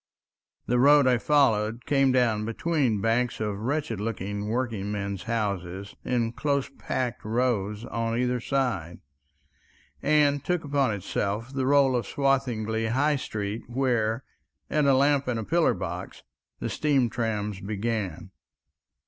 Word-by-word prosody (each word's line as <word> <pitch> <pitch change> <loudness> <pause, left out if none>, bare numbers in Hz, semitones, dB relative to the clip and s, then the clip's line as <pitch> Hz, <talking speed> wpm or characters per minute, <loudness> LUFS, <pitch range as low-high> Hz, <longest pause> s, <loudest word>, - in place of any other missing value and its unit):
The 125 0 +1
road 145 +2 +6
I 125 -2 +3
followed 115 -5 +2
came 135 -2 +3
down 120 -4 +2
between 115 -1 0
banks 115 +3 +1
of 105 -2 -2
wretched 130 -2 -2
looking 105 -1 -3
working 115 -4 -2
men's 100 -2 -4
houses, 100 -4 -3
in 120 -2 0
close 140 +2 -1
packed 125 -2 -2
rows 110 -2 -1
on 115 0 -2
either 125 0 +1
side, 115 - -1 1.0
and 145 -2 +3
took 180 -2 0
upon 140 -4 +1
itself 105 +4 -3
the 135 -1 -1
rôle 135 -1 +4
of 120 - -1
Swathinglea 120 -5 0
High 145 +3 +2
Street, 105 -3 -4
where, 120 -2 0 0.5
at 150 -1 +2
a 135 -1 +5
lamp 140 0 +3
and 120 -3 -1
a - - -3
pillar 170 +9 +2
box, 90 0 -6 0.4
the - - -2
steam 140 -5 +2
trams 105 -4 -2
began. 100 -4 -3
115 Hz, 135 wpm, -26 LUFS, 105-135 Hz, 1.0 s, road